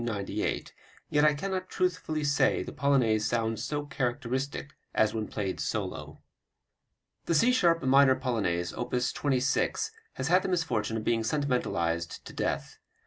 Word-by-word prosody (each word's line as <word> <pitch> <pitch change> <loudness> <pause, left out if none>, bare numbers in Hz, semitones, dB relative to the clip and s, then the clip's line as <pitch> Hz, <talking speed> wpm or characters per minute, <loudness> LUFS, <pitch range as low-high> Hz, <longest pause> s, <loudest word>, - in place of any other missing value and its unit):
Yet 105 -4 -2 0.5
I 150 -1 +5
cannot 185 +3 -3
truthfully 180 -4 -1
say 140 -1 +2
the - - -7
Polonaise 125 -7 +2
sounds 115 -1 -1
so 145 -1 -2
characteristic 135 0 -3 0.2
as 110 -1 +3
when 110 -1 -2
played 100 -3 -3
solo. - - -4 1.0
The 165 - +1
C 235 +11 +5
sharp 170 -9 +3
minor 135 0 +6
Polonaise, 100 -10 -1
op. 120 - -3
26, 130 +1 0 0.2
has 130 - -3
had 180 +3 +5
the 190 - -3
misfortune 120 - 0
of 110 - -4
being 115 0 +1
sentimentalized 110 - -1
to - - -9
death. - - -3
130 Hz, 140 wpm, -29 LUFS, 110-150 Hz, 1.0 s, minor